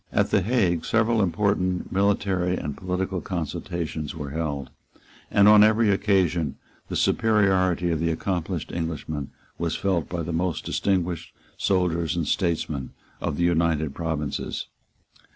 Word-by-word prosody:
At - - +1
the - - +4
Hague 90 -6 +1
several 115 0 +2
important 95 -1 0
military 95 -2 +1
and 75 -1 -4
political 95 0 -2
consultations 85 -2 -4
were 75 -3 -5
held; 75 -4 -3 0.6
and, 100 0 +5
on 105 0 +8
every 110 0 +4
occasion, 95 -7 +1 0.3
the - - -4
superiority 95 -5 +2
of 80 - 0
the 85 +1 +1
accomplished 85 0 -2
Englishman 80 -4 -4 0.3
was 85 -1 -1
felt 95 -5 0
by 85 -2 -3
the 85 +2 -4
most 85 0 -1
distinguished 90 -4 -1 0.2
soldiers 90 -3 +1
and 85 -4 -1
statesmen 80 -7 -1 0.3
of - - -2
the 85 - +1
United 80 -4 +1
Provinces. 80 -3 -3
85 Hz, 135 wpm, -25 LUFS, 80-95 Hz, 0.6 s, on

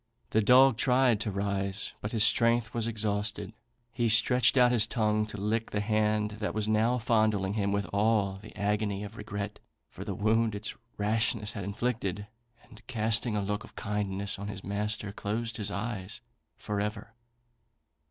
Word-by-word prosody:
The 110 - +3
dog 125 +2 +6
tried 125 -4 +3
to 110 - -1
rise, 100 0 -2
but 105 - -4
his 110 -3 +2
strength 115 0 +3
was 115 -1 -1
exhausted. 105 -1 -2 0.4
He 115 0 +1
stretched 120 +4 +4
out 125 -1 +6
his 115 -3 +3
tongue 105 -2 +1
to 105 - -7
lick 110 +3 -1
the 105 - -1
hand 105 0 +1
that 105 - -2
was 110 -1 -1
now 110 +3 +2
fondling 110 -4 +1
him 100 -2 0
with 100 0 0
all 100 -2 +2
the 110 - -13
agony 105 0 -1
of 105 +1 -8
regret 105 -1 -5 0.3
for - - -8
the - - -4
wound 110 +1 +2
its 105 +1 -4 0.2
rashness 110 +1 0
had 100 - -5
inflicted, 105 -1 -2 0.4
and 120 -3 -16
casting 115 -1 0
a 105 - 0
look 105 +1 -2
of - - -15
kindness 100 -1 -3
on 100 - -5
his 100 -2 -7
master, 105 0 -3
closed 110 +3 -3
his 105 -2 -2
eyes 100 -2 -4 0.4
for 105 -1 -3
ever. 105 +2 -4
105 Hz, 170 wpm, -29 LUFS, 100-115 Hz, 0.4 s, dog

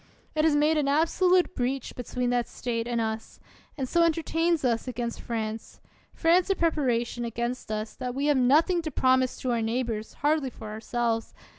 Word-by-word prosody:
It 310 0 +2
has 310 -2 +4
made 305 +2 +3
an 285 - 0
absolute 355 +5 +3
breach 260 -1 -2
between 245 0 -2
that 245 -1 +1
State 230 -1 -3
and 240 -1 -1
us; 220 0 -4 0.4
and 265 -3 -2
so 340 - +2
entertains 330 -1 +1
us 235 0 0
against 235 -1 -4
France, 220 -2 -5 0.4
France 345 +3 +3
in 390 - +2
preparation 245 -8 0
against 235 0 -3
us, 215 0 -3
that 250 -1 -4
we 280 +1 -1
have 295 -2 +3
nothing 310 +8 +4
to 320 - -4
promise 260 -2 +2
to 255 - -1
our 235 -1 +1
neighbors, 225 -1 -2
hardly 300 -3 +2
for 220 -3 -10
ourselves. 225 +1 -2
255 Hz, 175 wpm, -27 LUFS, 235-310 Hz, 0.4 s, has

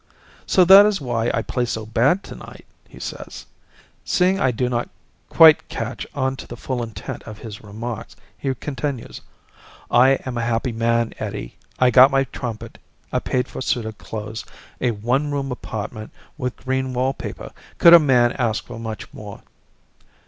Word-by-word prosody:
"So 185 - +5
that 195 +3 +9
is 205 -2 0
why 120 -3 -1
I 115 - -1
play 125 - -2
so 110 -2 -3
bad 130 - +2
tonight," - - -11 0.2
he - - -14
says. - - -7 0.6
Seeing 185 +2 +2
I 130 - +3
do 125 +1 -1
not 120 -1 -2 0.4
quite 160 -2 +6
catch 115 +2 -5
on 130 -1 0
to - - -9
the 120 - -8
full 125 0 -3
intent 110 -5 -6
of 110 -1 -8
his 105 -1 -9
remarks, 110 +2 -7 0.2
he 135 -1 -3
continues. 135 -3 -5 0.7
"I 130 +2 +6
am 125 -2 -3
a - - -1
happy 120 +2 -1
man, 115 0 0
Eddie. - - -5 0.2
I 125 -1 +4
got 130 +3 +8
my 135 -1 +2
trumpet, 120 -4 -7 0.3
a - - 0
paid 125 0 -1
for - - -7
suit 120 -3 -1
of 110 -1 -7
clothes, 110 0 -6 0.4
a 125 - +2
one 120 +7 0
room 140 -2 -2
apartment 110 -2 -6 0.3
with 125 -5 -4
green 130 0 -2
wallpaper. 130 +2 -3 0.3
Could 170 - +8
a 170 - +11
man 125 -5 +3
ask 115 -3 0
for 115 - -9
much 110 -2 -7
more?" - - -10
125 Hz, 170 wpm, -21 LUFS, 115-135 Hz, 0.7 s, a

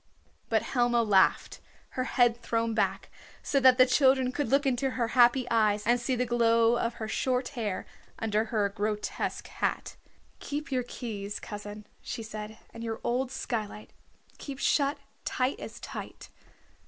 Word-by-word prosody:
But - - +2
Helma 240 -2 +2
laughed, 195 -3 +3 0.3
her 255 - -3
head 240 -2 +2
thrown 230 0 0
back, 220 - -1 0.3
so 280 - +1
that 260 -1 +6
the 255 - +8
children 260 -1 +3
could 290 +2 -2
look 280 +2 +2
into 265 0 +1
her 235 -2 0
happy 245 +1 +5
eyes 210 -2 +2
and 240 +2 +3
see 255 +1 0
the 250 +1 0
glow 230 -1 +3
of 235 0 -1
her 220 - -5
short 250 +3 0
hair 220 -8 -3 0.3
under 220 0 0
her 215 -2 +1
grotesque 210 +1 -3
hat. - - -3 0.4
"Keep 295 +1 -5
your 255 -1 +1
keys, 210 -5 -6
cousin," 210 0 -8 0.2
she 235 -2 -5
said, 215 0 -7 0.2
"and 230 - -8
your 225 -1 -4
old 250 +2 0
skylight 215 -5 -4 0.5
keep 275 -2 -7
shut 280 +1 +2 0.3
tight 255 +1 -1
as - - -8
tight. - - -8
235 Hz, 155 wpm, -29 LUFS, 220-255 Hz, 0.5 s, the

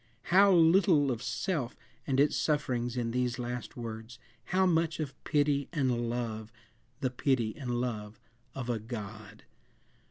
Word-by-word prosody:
How 200 +1 +7
little 165 -4 +5
of 120 -2 -3
self 125 +1 -2 0.3
and 135 -1 +1
its 145 +1 +4
sufferings 125 -5 0
in 115 -1 -1
these 125 0 0
last 125 0 -5
words; 115 0 -7 0.3
how 190 0 +2
much 165 -2 +1
of 145 -4 -3
pity 145 -2 +1
and 125 -7 0
love 110 -2 -3 0.5
the 130 -2 0
pity 125 -4 0
and 120 -3 -3
love 110 -4 -4 0.4
of 130 -3 -4
a 120 -2 -1
God! 110 -1 -8
125 Hz, 140 wpm, -30 LUFS, 115-145 Hz, 0.5 s, How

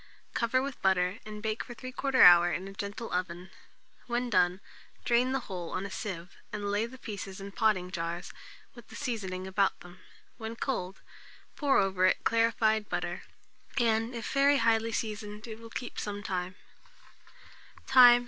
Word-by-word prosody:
Cover 255 +2 +1
with 275 -2 -5
butter, 185 +1 +2
and 210 0 -8
bake 220 0 -1
for 240 - -10
3/4 260 +2 -4
hour 175 0 +9
in 185 +5 -3
a 195 - -9
gentle 205 +4 -5
oven. 180 0 -3 0.6
When 240 0 -1
done, 180 -1 +3 0.5
drain 245 +2 +3
the 270 0 0
whole 180 -6 -6
on 185 - -3
a 200 - -6
sieve, 180 -3 -5 0.2
and 205 -1 -3
lay 210 +3 +1
the 260 +2 -12
pieces 200 -5 -7
in 200 +1 -7
potting 195 -4 +1
jars, 170 0 -4 0.4
with 240 -2 -14
the - - -12
seasoning 195 -9 -3
about 195 +1 +1
them. 175 +1 -13 0.4
When 225 0 -5
cold, 195 -7 -3 0.5
pour 285 -3 +3
over 190 -2 +3
it - - +1
clarified 225 -2 +2
butter, - - -3 0.6
and, 230 0 +2
if 230 -2 -4
very 280 +1 +5
highly 230 -2 +2
seasoned, 210 -1 -4
it 220 -1 -8
will 230 0 -11
keep 245 +1 -5
some 205 -1 -4
time. 185 -1 -3
210 Hz, 160 wpm, -30 LUFS, 185-230 Hz, 0.6 s, hour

